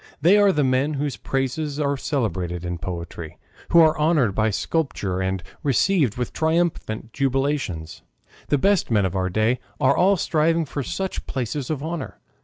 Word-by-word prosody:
They 170 Hz, +8 st, +5 dB
are 200 Hz, -1 st, +5 dB
the 150 Hz, -4 st, +1 dB
men 130 Hz, +3 st, +1 dB
whose 140 Hz, -2 st, -2 dB
praises 135 Hz, +6 st, -2 dB
are 140 Hz, -1 st, +1 dB
celebrated 95 Hz, -, -2 dB
in 85 Hz, -1 st, -4 dB
poetry, 85 Hz, -2 st, -6 dB, 0.3 s
who 170 Hz, -, +7 dB
are 160 Hz, -1 st, +5 dB
honored 150 Hz, -, +3 dB
by 110 Hz, +2 st, +1 dB
sculpture 105 Hz, -, -1 dB
and 95 Hz, -1 st, -2 dB, 0.2 s
received 145 Hz, -, +2 dB
with 125 Hz, -, -3 dB
triumphant 160 Hz, -9 st, -1 dB
jubilations. 135 Hz, -, -1 dB, 0.5 s
The 145 Hz, -, +2 dB
best 195 Hz, +5 st, +2 dB
men 105 Hz, -4 st, +3 dB
of 95 Hz, 0 st, -2 dB
our 95 Hz, -1 st, 0 dB
day 110 Hz, +6 st, +1 dB, 0.2 s
are 130 Hz, +1 st, +4 dB
all 195 Hz, +2 st, +4 dB
striving 165 Hz, 0 st, +1 dB
for 145 Hz, 0 st, -4 dB
such 190 Hz, +7 st, -4 dB
places 130 Hz, +1 st, -3 dB
of 150 Hz, -3 st, -2 dB
honor. 160 Hz, -3 st, -5 dB
135 Hz, 165 wpm, -23 LUFS, 105-155 Hz, 0.5 s, who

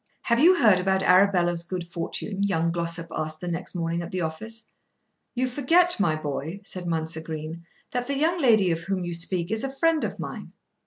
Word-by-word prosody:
"Have 235 Hz, 0 st, +2 dB
you 350 Hz, +6 st, +7 dB
heard 215 Hz, -, +5 dB
about 190 Hz, +1 st, +1 dB
Arabella's 180 Hz, -2 st, +4 dB
good 175 Hz, 0 st, -5 dB
fortune?" 175 Hz, +4 st, -4 dB
young 170 Hz, -4 st, +1 dB
Glossop 170 Hz, 0 st, -3 dB
asked 155 Hz, 0 st, -3 dB
the 180 Hz, -, -6 dB
next 175 Hz, +2 st, -4 dB
morning 170 Hz, 0 st, -1 dB
at 170 Hz, -, -6 dB
the 185 Hz, -1 st, -3 dB
office. 220 Hz, +8 st, -5 dB, 0.6 s
"You 255 Hz, +1 st, +1 dB
forget, 330 Hz, +7 st, +3 dB
my 170 Hz, -6 st, +2 dB
boy," 155 Hz, +5 st, -4 dB
said 185 Hz, -2 st, -6 dB
Mounser 160 Hz, -1 st, -2 dB
Green, 160 Hz, +1 st, -7 dB, 0.2 s
"that 245 Hz, -2 st, -2 dB
the 280 Hz, 0 st, -1 dB
young 330 Hz, +4 st, +1 dB
lady 215 Hz, -8 st, +4 dB
of 165 Hz, -, 0 dB
whom 185 Hz, +1 st, -3 dB
you 175 Hz, -, -3 dB
speak 170 Hz, +1 st, -1 dB
is 220 Hz, +2 st, -1 dB
a 270 Hz, -, -2 dB
friend 325 Hz, +2 st, +2 dB
of -, -, -3 dB
mine." -, -, -7 dB
180 Hz, 200 wpm, -25 LUFS, 165-225 Hz, 0.6 s, you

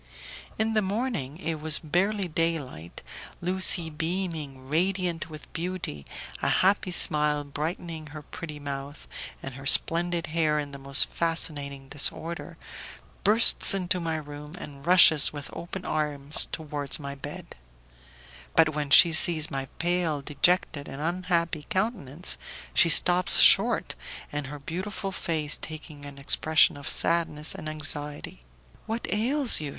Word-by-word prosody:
In 220 Hz, 0 st, 0 dB
the 215 Hz, -, +2 dB
morning, 200 Hz, -, -3 dB
it 160 Hz, -3 st, -4 dB
was 155 Hz, 0 st, +4 dB
barely 190 Hz, +5 st, -1 dB
day 165 Hz, 0 st, 0 dB
light, 85 Hz, -, -11 dB, 0.4 s
Lucie 180 Hz, -2 st, +2 dB
beaming, 160 Hz, -5 st, -4 dB
radiant 175 Hz, +2 st, -1 dB
with 155 Hz, -1 st, -12 dB
beauty, 170 Hz, -, -5 dB, 0.3 s
a -, -, 0 dB
happy 195 Hz, 0 st, +2 dB
smile 150 Hz, -3 st, +2 dB
brightening 155 Hz, +2 st, -6 dB
her 150 Hz, 0 st, -10 dB
pretty 155 Hz, -1 st, -9 dB
mouth, 140 Hz, 0 st, -8 dB, 0.4 s
and 135 Hz, -, -7 dB
her 135 Hz, +2 st, -8 dB
splendid 170 Hz, +3 st, +2 dB
hair 155 Hz, -2 st, +1 dB
in 145 Hz, -1 st, -4 dB
the 140 Hz, -, -10 dB
most 135 Hz, 0 st, +6 dB
fascinating 145 Hz, -5 st, -1 dB
disorder, 155 Hz, +4 st, -1 dB, 0.7 s
bursts 215 Hz, -1 st, +4 dB
into 180 Hz, -1 st, -1 dB
my 165 Hz, -2 st, -3 dB
room, 150 Hz, +1 st, -9 dB
and 140 Hz, -4 st, -11 dB
rushes 170 Hz, -4 st, +5 dB
with 145 Hz, -2 st, -8 dB
open 180 Hz, +2 st, -8 dB
arms 150 Hz, -1 st, +2 dB
towards 150 Hz, -3 st, -1 dB
my 140 Hz, -1 st, -7 dB
bed; 140 Hz, -, -9 dB, 1.0 s
but 165 Hz, -1 st, +5 dB
when 150 Hz, -1 st, -3 dB
she 165 Hz, +4 st, +7 dB
sees 160 Hz, -1 st, +2 dB
my 135 Hz, -1 st, -4 dB
pale, 170 Hz, -3 st, -1 dB
dejected, 150 Hz, 0 st, 0 dB
and 135 Hz, -, -9 dB
unhappy 170 Hz, -1 st, -2 dB
countenance, 185 Hz, -, -2 dB, 0.3 s
she 170 Hz, -, +5 dB
stops 180 Hz, +2 st, +4 dB
short, -, -, +6 dB, 0.4 s
and 145 Hz, -2 st, -4 dB
her 145 Hz, +2 st, -8 dB
beautiful 190 Hz, +7 st, -6 dB
face 160 Hz, -5 st, 0 dB
taking 155 Hz, -2 st, -9 dB
an 140 Hz, -1 st, -12 dB
expression 155 Hz, +3 st, +3 dB
of 140 Hz, -1 st, -6 dB
sadness 165 Hz, -2 st, +2 dB
and 155 Hz, -, -7 dB
anxiety: 145 Hz, -, -2 dB, 0.4 s
"What 225 Hz, +2 st, -4 dB
ails 245 Hz, -, +2 dB
you?" 150 Hz, -, -5 dB
160 Hz, 135 wpm, -26 LUFS, 145-175 Hz, 1.0 s, she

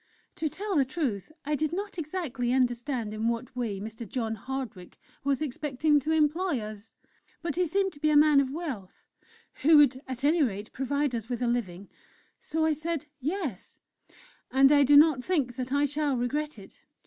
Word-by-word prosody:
To 315 Hz, -2 st, -1 dB
tell 400 Hz, +4 st, -4 dB
the 285 Hz, -, +5 dB
truth, 260 Hz, -, -3 dB
I 300 Hz, -, -1 dB
did 305 Hz, +1 st, 0 dB
not 395 Hz, +1 st, -4 dB
exactly 290 Hz, -7 st, -2 dB
understand 245 Hz, -2 st, 0 dB
in 215 Hz, +1 st, -1 dB
what 235 Hz, +2 st, -3 dB
way 225 Hz, -6 st, -2 dB
Mr. 220 Hz, +1 st, -7 dB
John 225 Hz, -3 st, -2 dB
Hardwick 225 Hz, -5 st, -6 dB, 0.3 s
was 280 Hz, +1 st, 0 dB
expecting 295 Hz, +1 st, +1 dB
to 305 Hz, +3 st, -2 dB
employ 320 Hz, 0 st, +2 dB
us; 215 Hz, 0 st, -9 dB, 0.5 s
but 330 Hz, -4 st, -2 dB
he 360 Hz, 0 st, +1 dB
seemed 385 Hz, +3 st, 0 dB
to 290 Hz, -, -15 dB
be 305 Hz, +1 st, +2 dB
a 300 Hz, -, +5 dB
man 300 Hz, -1 st, +6 dB
of 275 Hz, -2 st, +1 dB
wealth, 270 Hz, -, -6 dB, 0.6 s
who 310 Hz, +2 st, +7 dB
would 275 Hz, -3 st, +5 dB
at 260 Hz, 0 st, -5 dB
any 315 Hz, +3 st, +3 dB
rate 210 Hz, -5 st, -2 dB
provide 280 Hz, +1 st, -1 dB
us 230 Hz, -1 st, -4 dB
with 245 Hz, 0 st, -2 dB
a -, -, +1 dB
living. 200 Hz, -6 st, -2 dB, 0.5 s
So 320 Hz, +1 st, -1 dB
I 320 Hz, -, +3 dB
said, 315 Hz, 0 st, -3 dB
'Yes,' 290 Hz, -, -4 dB, 0.7 s
And 270 Hz, +1 st, +5 dB
I 290 Hz, -1 st, +6 dB
do 285 Hz, +1 st, +6 dB
not 295 Hz, -4 st, +5 dB
think 280 Hz, -9 st, 0 dB
that 255 Hz, 0 st, -4 dB
I 285 Hz, +1 st, +3 dB
shall 290 Hz, -1 st, 0 dB
regret 295 Hz, +4 st, -2 dB
it." 195 Hz, -1 st, -15 dB
275 Hz, 185 wpm, -28 LUFS, 240-305 Hz, 0.7 s, who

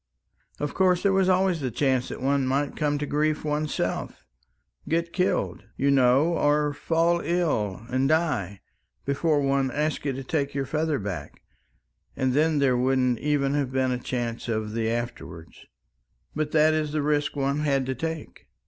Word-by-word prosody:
Of 145 Hz, -, -3 dB
course 180 Hz, -1 st, +2 dB
there 200 Hz, -1 st, +3 dB
was 190 Hz, -1 st, +3 dB
always 185 Hz, -3 st, +2 dB
the 130 Hz, -, -1 dB
chance 130 Hz, +1 st, 0 dB
that -, -, -7 dB
one 140 Hz, -1 st, +1 dB
might 140 Hz, +2 st, 0 dB
come 145 Hz, -1 st, 0 dB
to 150 Hz, -, -2 dB
grief 150 Hz, +1 st, 0 dB
oneself 150 Hz, 0 st, -2 dB, 0.6 s
get 170 Hz, +1 st, 0 dB
killed, 180 Hz, -1 st, -1 dB
you 140 Hz, +1 st, +2 dB
know, 135 Hz, +5 st, +4 dB
or 150 Hz, 0 st, +2 dB
fall 165 Hz, +3 st, +1 dB
ill 130 Hz, -, -1 dB
and 130 Hz, +2 st, 0 dB
die 155 Hz, -, 0 dB, 0.4 s
before 145 Hz, +2 st, +1 dB
one 135 Hz, -1 st, +1 dB
asked 150 Hz, +3 st, -1 dB
you 140 Hz, -2 st, -1 dB
to 135 Hz, +1 st, -6 dB
take 140 Hz, 0 st, -2 dB
your 140 Hz, -1 st, -1 dB
feather 155 Hz, +1 st, 0 dB
back; 100 Hz, -5 st, -6 dB, 0.7 s
and 130 Hz, -2 st, 0 dB
then 155 Hz, +2 st, +2 dB
there 135 Hz, -3 st, +3 dB
wouldn't 125 Hz, -1 st, +1 dB
even 145 Hz, -2 st, +1 dB
have 140 Hz, -3 st, -1 dB
been 130 Hz, -1 st, +1 dB
a 125 Hz, -, -1 dB
chance 120 Hz, -2 st, -4 dB
of 110 Hz, -1 st, -2 dB
the 115 Hz, -1 st, -1 dB
afterwards. 115 Hz, -8 st, -6 dB, 0.7 s
But 155 Hz, 0 st, -1 dB
that 155 Hz, 0 st, +4 dB
is 155 Hz, -1 st, -1 dB
the 155 Hz, -2 st, 0 dB
risk 150 Hz, 0 st, 0 dB
one 140 Hz, +1 st, 0 dB
had 140 Hz, -3 st, +1 dB
to 130 Hz, -, -2 dB
take." 160 Hz, +4 st, -6 dB
145 Hz, 170 wpm, -26 LUFS, 130-155 Hz, 0.7 s, know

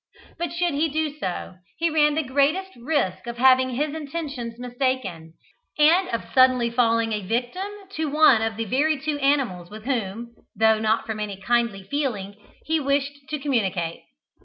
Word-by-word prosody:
But, 345 Hz, -, -2 dB
should 345 Hz, -1 st, 0 dB
he 300 Hz, +3 st, +1 dB
do 305 Hz, 0 st, -2 dB
so, 180 Hz, -2 st, -4 dB, 0.2 s
he 335 Hz, 0 st, +1 dB
ran 300 Hz, -1 st, +3 dB
the 315 Hz, -, +1 dB
greatest 290 Hz, +8 st, +1 dB
risk 240 Hz, -, -1 dB
of 235 Hz, 0 st, -5 dB
having 260 Hz, +1 st, +5 dB
his 290 Hz, +4 st, -2 dB
intentions 285 Hz, -6 st, -5 dB
mistaken, 245 Hz, -10 st, -3 dB, 0.4 s
and 335 Hz, +5 st, +4 dB
of 230 Hz, -, -2 dB
suddenly 255 Hz, -2 st, +4 dB
falling 230 Hz, -2 st, +2 dB
a 210 Hz, -, -1 dB
victim 245 Hz, -, -2 dB, 0.2 s
to 320 Hz, -6 st, -2 dB
one 285 Hz, -6 st, +5 dB
of 225 Hz, 0 st, -1 dB
the 225 Hz, -, -2 dB
very 290 Hz, +7 st, +1 dB
two 300 Hz, 0 st, -2 dB
animals 265 Hz, -12 st, 0 dB
with 215 Hz, +1 st, -10 dB
whom 235 Hz, -2 st, -3 dB, 0.2 s
(though 220 Hz, 0 st, +4 dB
not 220 Hz, +1 st, +1 dB
from 220 Hz, -1 st, -4 dB
any 205 Hz, -2 st, -4 dB
kindly 230 Hz, -2 st, 0 dB
feeling) 210 Hz, -5 st, -3 dB, 0.3 s
he 320 Hz, 0 st, +1 dB
wished 280 Hz, 0 st, 0 dB
to 305 Hz, -, -2 dB
communicate. 195 Hz, -, -1 dB
255 Hz, 165 wpm, -24 LUFS, 220-295 Hz, 0.4 s, having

